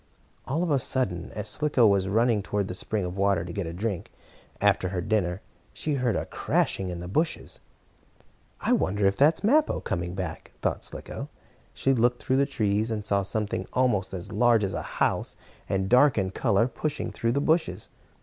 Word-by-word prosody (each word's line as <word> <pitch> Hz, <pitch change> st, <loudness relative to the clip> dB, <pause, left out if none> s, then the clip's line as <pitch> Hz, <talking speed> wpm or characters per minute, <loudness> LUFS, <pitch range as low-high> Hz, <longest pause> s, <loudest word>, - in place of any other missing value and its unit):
All 155 Hz, +6 st, 0 dB
of 175 Hz, -, -1 dB
a 140 Hz, -, +3 dB
sudden, 105 Hz, -12 st, 0 dB
as 105 Hz, -1 st, -4 dB
Slicko 145 Hz, -2 st, +2 dB
was 100 Hz, -2 st, +3 dB
running 110 Hz, +2 st, +2 dB
toward 100 Hz, 0 st, -2 dB
the -, -, -4 dB
spring 100 Hz, +1 st, -2 dB
of 90 Hz, +1 st, -5 dB
water 100 Hz, -3 st, +1 dB
to 85 Hz, -, -7 dB
get 100 Hz, -4 st, -3 dB
a -, -, -4 dB
drink, 95 Hz, +1 st, -3 dB, 0.5 s
after 100 Hz, -2 st, +2 dB
her 95 Hz, -1 st, -2 dB
dinner, 95 Hz, -2 st, 0 dB, 0.3 s
she 155 Hz, -, -2 dB
heard 125 Hz, -5 st, +1 dB
a -, -, -1 dB
crashing 95 Hz, -1 st, 0 dB
in 85 Hz, -1 st, -5 dB
the 90 Hz, -, -6 dB
bushes. 155 Hz, -, -2 dB, 1.0 s
"I -, -, +2 dB
wonder 100 Hz, +1 st, +1 dB
if 95 Hz, 0 st, +3 dB
that 150 Hz, +4 st, +5 dB
is -, -, -8 dB
Mappo 295 Hz, +8 st, +3 dB
coming 90 Hz, -1 st, -3 dB
back," 95 Hz, -1 st, -6 dB
thought -, -, -1 dB
Slicko. -, -, -6 dB, 0.5 s
She 135 Hz, -, +2 dB
looked 120 Hz, 0 st, +2 dB
through 130 Hz, -, +1 dB
the 140 Hz, 0 st, +3 dB
trees, 105 Hz, -3 st, 0 dB
and 105 Hz, -2 st, -3 dB
saw 100 Hz, 0 st, +2 dB
something 105 Hz, +2 st, -2 dB
almost 120 Hz, -7 st, +1 dB
as 90 Hz, -2 st, -6 dB
large 120 Hz, -3 st, +4 dB
as 95 Hz, -, -1 dB
a -, -, -2 dB
house, -, -, -1 dB, 0.3 s
and 95 Hz, 0 st, 0 dB
dark 125 Hz, +3 st, +5 dB
in 95 Hz, -2 st, 0 dB
color, 115 Hz, +1 st, +2 dB
pushing 150 Hz, +3 st, -3 dB
through 115 Hz, 0 st, -1 dB
the 140 Hz, -, +1 dB
bushes. 160 Hz, +3 st, 0 dB
105 Hz, 195 wpm, -27 LUFS, 95-125 Hz, 1.0 s, that